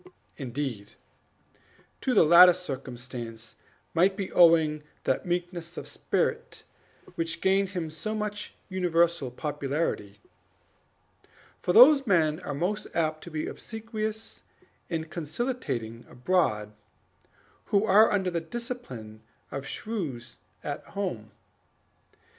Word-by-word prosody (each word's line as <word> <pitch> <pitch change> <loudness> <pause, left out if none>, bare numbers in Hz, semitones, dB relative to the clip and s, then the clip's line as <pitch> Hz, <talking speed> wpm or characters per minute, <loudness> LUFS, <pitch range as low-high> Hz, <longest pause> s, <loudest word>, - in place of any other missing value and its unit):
Indeed, 125 -6 -5 1.1
to 255 - 0
the - - +7
latter 175 +3 +9
circumstance 125 -8 -7 0.4
might 190 +3 +3
be 195 -2 -4
owing 160 -3 +5 0.2
that 130 - 0
meekness 175 -1 -3
of - - -5
spirit - - -2 0.5
which 165 0 -3
gained 195 0 +2
him 165 -3 -3
such 210 +5 -4
universal 170 -6 +1
popularity; 140 -6 -3 1.4
for - - 0
those 270 +6 +8
men 160 -5 +3
are 145 -6 -5
most 180 +8 -2
apt 155 -2 0
to - - -8
be 155 -1 -3
obsequious 220 -1 -5 0.5
and 160 -2 -2
conciliating 150 - -4
abroad, 120 - 0 0.9
who 205 +1 +2
are 215 +2 +6
under 190 -3 +1
the 170 -1 -1
discipline 165 - -7 0.3
of 135 0 -5
shrews 140 - -5 0.2
at 145 -1 -4
home. 120 - -3
165 Hz, 105 wpm, -28 LUFS, 135-195 Hz, 1.4 s, latter